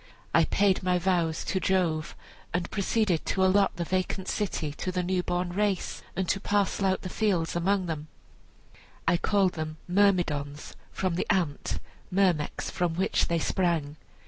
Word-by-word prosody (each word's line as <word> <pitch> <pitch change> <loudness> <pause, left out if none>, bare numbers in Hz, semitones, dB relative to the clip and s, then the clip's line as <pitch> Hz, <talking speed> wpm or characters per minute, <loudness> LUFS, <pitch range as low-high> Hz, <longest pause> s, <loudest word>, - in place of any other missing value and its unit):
I - - +5
paid 195 -2 +2
my 180 -1 +2
vows 175 -3 0
to 190 - 0
Jove, 170 -4 0 0.4
and 175 -1 -2
proceeded 200 -4 +1
to 190 -1 +2
allot 195 +1 +3
the 175 - -2
vacant 185 +2 -2
city 175 -7 -2
to 185 - -3
the 180 0 -1
new 180 0 +1
born 175 0 -2
race, 200 -1 -1
and 190 0 -1
to 195 - +1
parcel 200 -1 +1
out 190 0 0
the - - -3
fields 185 -5 0
among 190 +2 +1
them 155 -3 -4 1.0
I 175 - +4
called 195 0 +2
them 155 -1 -5
Myrmidons, 175 -7 +1 0.2
from 185 -2 -1
the 175 - -1
ant 175 -8 0 0.3
(myrmex) 180 -6 +1
from 175 -2 -1
which 190 +3 +1
they 170 - +1
sprang. 160 -3 0
180 Hz, 160 wpm, -28 LUFS, 170-190 Hz, 1.0 s, I